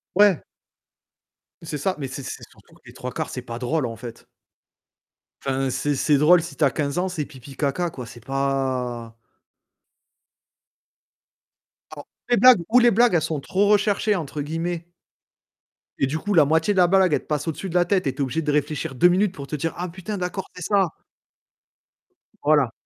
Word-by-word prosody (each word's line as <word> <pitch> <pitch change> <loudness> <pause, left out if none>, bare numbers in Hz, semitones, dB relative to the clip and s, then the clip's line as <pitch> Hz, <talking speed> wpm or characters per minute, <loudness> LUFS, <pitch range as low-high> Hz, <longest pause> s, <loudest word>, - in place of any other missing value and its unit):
Ouais. 205 -4 +5 1.2
C'est 150 -2 -5
ça, 190 +6 -1
mais 140 -3 -4
c'est 130 +2 -7
c'est - - -7
surtout - - -22
que - - -24
les - - -13
3/4, - - -5
c'est - - -5
pas 115 - -7
drôle, 130 +3 -1
en 115 - -6
fait. 115 0 -10 1.2
Enfin, 135 0 0
c'est 140 +3 -1
c'est 145 +2 +2
drôle, 165 +5 +6
si 165 -3 -8
tu 155 - -1
as 140 - +4
15 140 +1 -2
ans, 185 +1 0
c'est 160 -5 -3
pipi, 135 -1 -13
caca 155 +5 -1
quoi, 125 -4 -8
c'est 120 0 -13
pas 130 -4 -2 2.8
Alors 145 - -11 0.2
les 240 - +4
blagues 250 -3 +7
ou 245 +3 +6
les 240 -1 +5
blagues 235 +1 +4
elles 170 - +3
sont 155 -1 -2
trop, 195 +8 0
«recherchées», 210 0 +2
entre 150 -3 -5
guillemets 165 +3 -3 1.1
et - - +3
du 155 +4 -2
coup, 205 +5 -2
la 160 -5 +6
moitié 160 +7 +2
de - - -5
la 180 - +6
blague, 185 -2 +4
elle - - +1
te - - -24
passe 150 0 -2
au-dessus 165 +4 -4
de 175 - -7
la 175 0 +4
tête 185 0 +1
et 135 - 0
tu - - -16
es - - +3
obligé 135 +5 -2
de 150 -2 -1
réfléchir 145 -1 -1
2 175 - +5
minutes 190 +2 +2
pour 140 -5 -8
te 150 - -4
dire: 160 +3 -2
«Ah 180 +1 -4
putain 190 +4 -6
d'accord, 180 +1 -4
c'est 180 - -7
ça». 195 -1 +2 1.5
Voilà. 145 -5 +3
155 Hz, 195 wpm, -23 LUFS, 135-180 Hz, 2.8 s, blagues